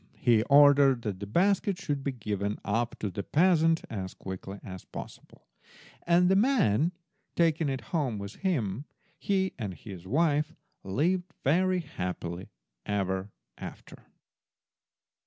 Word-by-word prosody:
He 115 -3 +4
ordered 140 -3 +6
that 100 -4 -3
the 100 - -6
basket 195 - +2
should 145 -8 -3
be 140 - -1
given 105 -4 -3
up 115 +3 -1
to 105 - -2
the 100 - -3
peasant 165 - +3
as 95 -4 -5
quickly 95 +1 -7
as 95 -3 -8
possible, - - -10 0.6
and 175 +1 +5
the 190 - +4
man 195 - +3 0.4
taking 165 -2 +2
it 135 -1 -2
home 135 -10 0
with 100 0 -7
him, 135 - -1 0.3
he 190 -1 0
and 100 -5 -4
his 95 -4 -10
wife 150 - +1 0.3
lived 175 - 0
very 185 +5 +2
happily 90 - -5 0.3
ever 95 -1 -1 0.3
after. - - -10
135 Hz, 130 wpm, -29 LUFS, 100-170 Hz, 0.6 s, ordered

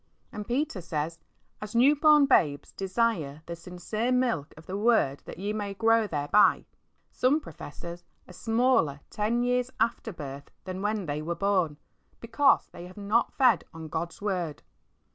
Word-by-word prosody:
And 210 -2 -7
Peter 245 -5 -1
says, 165 0 -3 0.4
"As 210 +1 -7
new 265 +5 +6
born 300 -1 +6
babes, 150 - +2
desire 185 -7 -1
the 170 - -6
sincere 180 +7 -3
milk 245 - 0
of 160 - -13
the 185 - -5
Word 205 - +2
that - - -9
ye 200 +3 -3
may 205 -2 -4
grow 225 +1 +3
thereby." 155 +5 +3 0.5
Some 275 +5 +2
professors 170 - -9 0.2
are 180 - -12
smaller 225 - +1
ten 225 +3 0
years 250 0 +1
after 230 -1 0
birth 140 -5 -8
than 185 0 -5
when 210 -1 -1
they 150 0 -3
were 170 +3 -3
born, 185 -5 +1 0.4
because 235 +5 +3
they 175 +1 -9
have 185 - -15
not 210 +3 +1
fed 250 -8 +4
on 160 -1 -8
God's 170 +5 -4
Word. 175 - -2
200 Hz, 160 wpm, -28 LUFS, 165-230 Hz, 0.5 s, new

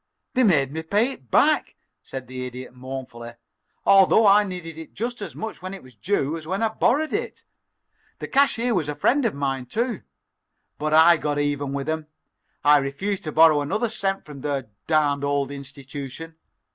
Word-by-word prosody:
"They 260 - +2
made 145 - +3
me 160 +2 -4
pay 205 +10 +1
it 130 - -13
back," - - +3 0.3
said 130 -1 -7
the 130 0 -6
Idiot, 125 0 -9
mournfully, 125 -2 -8 0.5
"although 195 +3 +6
I 205 +1 +6
needed 180 -4 -6
it 160 0 -11
just 240 +2 -4
as 200 - -6
much 220 -3 -6
when 185 +1 -6
it 195 - -12
was 130 -1 -16
due 150 - -1
as 155 -1 -10
when 190 +5 -1
I 225 - +2
borrowed 280 +7 +1
it. 470 +3 -3 0.7
The - - -6
cashier 250 -3 +2
was 160 -7 0
a 150 - -3
friend 250 - +2
of 220 - 0
mine, 135 -3 -2
too. 230 - -2 0.8
But 155 +1 +1
I 165 +2 +7
got 150 -1 -2
even 145 -1 -1
with 140 0 -3
'em. 155 -1 -2 0.6
I 145 0 +7
refused 180 +9 -3
to 155 - -3
borrow 155 -1 +6
another 215 +11 -1
cent 195 -3 -2
from 145 -3 -10
their 135 -6 -3 0.2
darned 145 -3 +2
old 140 -1 0
institution. 140 +3 -8
155 Hz, 185 wpm, -24 LUFS, 140-200 Hz, 0.8 s, I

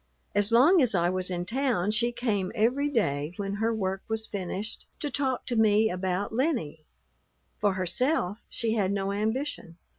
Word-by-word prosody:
As 205 +2 +2
long 295 +10 +6
as 245 -6 +2
I 175 0 +2
was 185 0 0
in 175 -1 -2
town 230 -4 0
she 235 +2 +1
came 210 -6 -1
every 250 +6 +2
day 150 - 0
when 200 0 -3
her 225 +1 +2
work 195 -3 -2
was 220 0 -2
finished 200 +2 -5
to 295 - -3
talk 265 -3 -1
to 245 - -2
me 220 0 +4
about 185 +3 -2
Lennie. 225 - -1 0.7
For 205 -2 +2
herself 190 - 0
she 225 -1 -1
had 200 -4 +1
no 195 0 -1
ambition. 215 - -3
210 Hz, 170 wpm, -28 LUFS, 185-240 Hz, 0.7 s, long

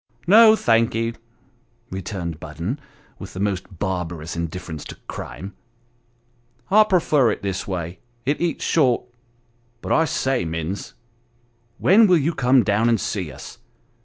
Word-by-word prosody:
" 120 +1 -33
No, 220 +3 +8
thank 115 - +2
ye," 115 +1 -1 0.8
returned 90 -3 -5
Budden, 85 - -5 0.4
with 95 - -9
the - - -5
most 95 -2 -3
barbarous 85 -4 -3
indif 85 +2 -4
ference 80 -3 -6
to - - -8
crime, 80 +11 -7 0.6
" 120 +1 -38
I 215 +2 +7
prefer 155 - +3
it - - -3
this 95 -2 -3
way, 90 -2 -4 0.3
it 145 +4 0
eats 170 -1 -1
short 130 -7 +2 0.8
But - - -6
I 160 - +4
say, 135 - 0
Minns, 80 +3 -4 0.8
when 215 +4 +5
will 180 -2 +5
you 160 +3 0
come 125 -2 +4
down 110 +4 +2
and 115 - +2
see 90 -7 -3
us? - - -11
110 Hz, 150 wpm, -22 LUFS, 90-135 Hz, 0.8 s, No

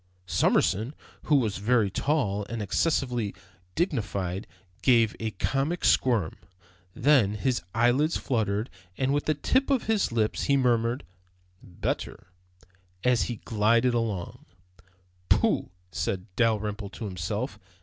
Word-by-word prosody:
Summerson, 95 - +1 0.3
who 150 - +3
was 110 -7 +1
very 105 0 +2
tall 105 -7 0
and 115 - -4
excessively 120 - 0 0.4
dignified, 105 - -2 0.3
gave 115 -4 +4
a 110 - -2
comic 135 - -1
squirm. 115 -11 +2 0.6
Then 120 -7 +4
his 125 0 0
eyelids 125 +8 +3
fluttered 110 -3 -1 0.3
and 135 +1 +1
with 145 - 0
the 155 - +1
tips 260 - +1
of 270 -4 +2
his 215 - +1
lips 110 -2 0
he 140 -1 +3
murmured, 120 -1 +1 0.6
"Better," 90 0 -5 0.7
as 125 -2 +3
he 120 -4 -5
glided 115 +3 +3
along. 110 -7 -3 0.8
"Pooh," - - +2 0.2
said 90 +4 -2
Dalrymple 105 -3 0
to 110 +3 -7
himself. 105 +5 -4
115 Hz, 120 wpm, -27 LUFS, 105-130 Hz, 0.8 s, gave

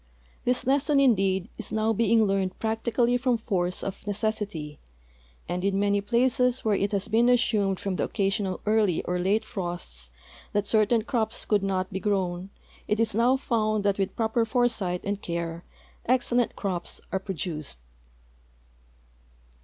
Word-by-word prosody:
This 250 0 +1
lesson, 280 +2 +3
indeed, 195 -7 +3
is 225 - -4
now 220 +1 +1
being 225 0 +3
learned 195 -2 0
practically 235 +2 +1
from 250 -1 +1
force 180 -5 -1
of 195 +1 -6
necessity, 205 -8 -3 0.7
and 180 +1 -3
in 195 0 +1
many 200 0 +2
places 250 +3 +1
where 215 - +3
it 200 0 0
has 200 -2 -1
been 230 +3 +3
assumed 205 -6 +2
from 195 -2 -3
the - - 0
occasional 195 -2 -1
early 210 -5 +2
or 180 0 -1
late 205 +5 +1
frosts 175 - -6 0.4
that 205 0 +1
certain 220 +1 +3
crops 225 -3 -1
could 210 -2 +2
not 190 -1 -1
be 190 - -2
grown 190 -2 -1 0.4
it 210 - 0
is 225 -1 +2
now 240 +5 +3
found 215 -5 0
that 200 -1 +1
with 195 0 -1
j)roper 225 0 +1
foresight 225 -7 +1
and 200 0 -3
care 170 0 -4 0.4
ex 255 0 +2
cellent 240 -1 +2
crops 185 -4 -4
are 190 - 0
])roduced. 160 - -4
205 Hz, 155 wpm, -26 LUFS, 190-230 Hz, 0.7 s, lesson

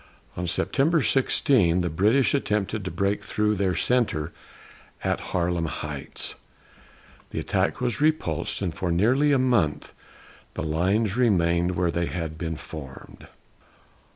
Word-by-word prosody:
On 90 0 -3
September 145 - +1
16 110 -6 +3
the 90 - -1
British 110 - +3
attempted 105 -5 -1
to 90 - -3
break 100 +4 -1
through 105 +1 0
their 95 -3 0
centre 85 -8 0 0.7
at - - 0
Harlem 85 -2 0
Heights. 75 -2 -3 1.0
The - - -8
attack - - 0
was 125 +2 -2
repulsed, 150 - 0
and 90 -4 -1
for 90 -2 -2
nearly 125 +12 +3
a 140 - +4
month 120 - +1 0.6
the - - -3
lines 95 +7 +1
remained 90 -7 +2
where 85 -1 +1
they 85 0 -1
had 80 -3 -4
been 80 -1 -3
formed. 70 -4 -10
95 Hz, 130 wpm, -25 LUFS, 85-120 Hz, 1.0 s, a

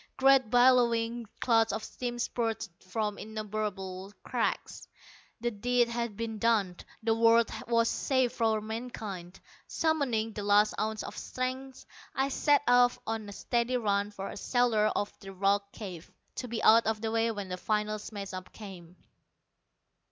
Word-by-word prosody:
Great 270 -3 +5
billowing 240 -2 +3
clouds 225 -2 +3
of 220 +1 -3
steam 240 +2 -5
spurted 225 -3 -2
from 210 +2 -3
innumerable 205 -3 -5
cracks. - - -2 0.5
The 240 0 0
deed 240 +3 +1
had 235 -3 -3
been 225 -1 -4
done! 205 -6 +2 0.3
The 225 0 +3
world 230 0 +4 0.2
was 230 -1 +3
saved 260 -1 +1
for 220 -2 +1
mankind! 215 -5 -6 0.3
Summoning 255 -9 0
the 205 - -5
last 205 +1 +4
ounce 215 0 -1
of - - -7
strength, 260 +1 -5 0.3
I 270 +1 +1
set 290 +1 +3
off 245 0 +5
on 220 -2 -3
a - - -7
steady 240 +4 0
run 205 -3 0
for 195 -1 -6
the - - -8
shelter 235 -2 +2
of 205 -1 -1
the 195 0 -10
rock 200 +1 +1
cave, 185 -6 -8 0.3
to 250 - -3
be 230 -1 -4
out 230 +1 +6
of 220 -1 0
the 220 0 -2
way 225 0 +2
when 205 -4 -4
the 180 - -3
final 215 +2 -1
smash 200 -2 -7
up 185 0 -7
came. 180 -5 -11
225 Hz, 155 wpm, -30 LUFS, 205-240 Hz, 0.5 s, out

